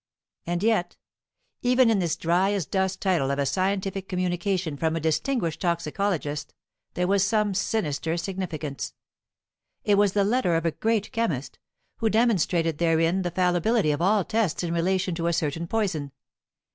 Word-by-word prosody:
And 175 Hz, +2 st, -1 dB
yet, 215 Hz, -6 st, +1 dB, 0.6 s
even 250 Hz, -1 st, +4 dB
in 210 Hz, -, +2 dB
this 170 Hz, -4 st, 0 dB
dry 180 Hz, +4 st, +2 dB
as 195 Hz, -6 st, -1 dB
dust 190 Hz, +4 st, -1 dB
title 175 Hz, -9 st, +2 dB
of 140 Hz, -, 0 dB
a 140 Hz, -, +1 dB
scientific 190 Hz, +5 st, -1 dB
communication 180 Hz, -2 st, -1 dB
from 160 Hz, +2 st, 0 dB
a -, -, -1 dB
distinguished 165 Hz, -, -1 dB
toxicologist 170 Hz, -3 st, -2 dB, 0.4 s
there 180 Hz, -, +1 dB
was 195 Hz, +1 st, +3 dB
some 210 Hz, 0 st, +1 dB
sinister 165 Hz, -5 st, -1 dB
significance. 165 Hz, -6 st, -4 dB, 0.9 s
It 205 Hz, -1 st, +3 dB
was 205 Hz, -2 st, +3 dB
the 205 Hz, -, +3 dB
letter 210 Hz, -4 st, +2 dB
of 165 Hz, 0 st, 0 dB
a 165 Hz, -, +2 dB
great 220 Hz, +3 st, -1 dB
chemist, 170 Hz, -, -2 dB, 0.4 s
who 225 Hz, -, +1 dB
demonstrated 180 Hz, -8 st, +2 dB
therein 165 Hz, +2 st, +2 dB
the 180 Hz, -, -1 dB
fallibility 180 Hz, +2 st, +2 dB
of 145 Hz, -, -2 dB
all 195 Hz, +1 st, +3 dB
tests 215 Hz, -7 st, 0 dB
in 170 Hz, -1 st, -2 dB
relation 185 Hz, +2 st, 0 dB
to 165 Hz, 0 st, -2 dB
a 170 Hz, -, +1 dB
certain 165 Hz, +1 st, -1 dB
poison. 175 Hz, -10 st, -1 dB
180 Hz, 160 wpm, -25 LUFS, 165-200 Hz, 0.9 s, even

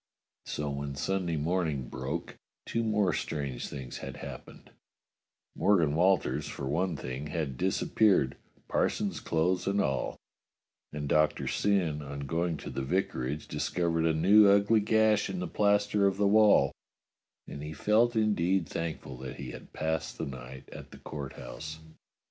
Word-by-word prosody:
So 75 Hz, -1 st, -3 dB
when 70 Hz, 0 st, -4 dB
Sunday 85 Hz, +3 st, -1 dB
morning 80 Hz, -4 st, -1 dB
broke, 65 Hz, +1 st, -5 dB, 0.3 s
two 115 Hz, -, -1 dB
more 105 Hz, -4 st, +2 dB
strange 70 Hz, -5 st, -3 dB
things 65 Hz, -3 st, -7 dB
had -, -, -7 dB
happened: -, -, -10 dB, 0.8 s
Morgan 85 Hz, -7 st, +3 dB
Walters, 95 Hz, +3 st, +2 dB
for 70 Hz, -, -5 dB
one 85 Hz, +5 st, 0 dB
thing, 65 Hz, +3 st, -5 dB
had 75 Hz, -4 st, -3 dB
disappeared, 95 Hz, -, +2 dB, 0.3 s
parson's -, -, 0 dB
clothes 90 Hz, +4 st, 0 dB
and 100 Hz, +1 st, +1 dB
all, 70 Hz, -8 st, -1 dB, 0.7 s
and 75 Hz, -1 st, -4 dB
Doctor 75 Hz, +1 st, +2 dB
Syn, 90 Hz, -7 st, +1 dB
on 70 Hz, 0 st, -6 dB
going 80 Hz, +3 st, -1 dB
to -, -, -7 dB
the -, -, -3 dB
vicarage, 70 Hz, -3 st, -2 dB
discovered 85 Hz, -2 st, 0 dB
a 80 Hz, -, +3 dB
new 100 Hz, +6 st, +6 dB
ugly 100 Hz, +2 st, +5 dB
gash 110 Hz, 0 st, +3 dB
in 95 Hz, -, -3 dB
the 90 Hz, -, -3 dB
plaster 105 Hz, -1 st, +2 dB
of 95 Hz, -1 st, 0 dB
the 100 Hz, -, +2 dB
wall, 105 Hz, 0 st, +5 dB, 0.8 s
and 70 Hz, -, -7 dB
he 75 Hz, +1 st, -5 dB
felt 110 Hz, +8 st, +2 dB
indeed 95 Hz, -5 st, +2 dB
thank 85 Hz, +2 st, -3 dB
ful 65 Hz, -, -9 dB
that 65 Hz, 0 st, -7 dB
he 65 Hz, -3 st, -7 dB
had -, -, -11 dB
passed 80 Hz, -1 st, -2 dB
the -, -, -3 dB
night 65 Hz, -1 st, -9 dB
at -, -, -10 dB
the -, -, -12 dB
Court 70 Hz, -3 st, -7 dB
House. 80 Hz, +6 st, -7 dB
80 Hz, 155 wpm, -30 LUFS, 70-100 Hz, 0.8 s, new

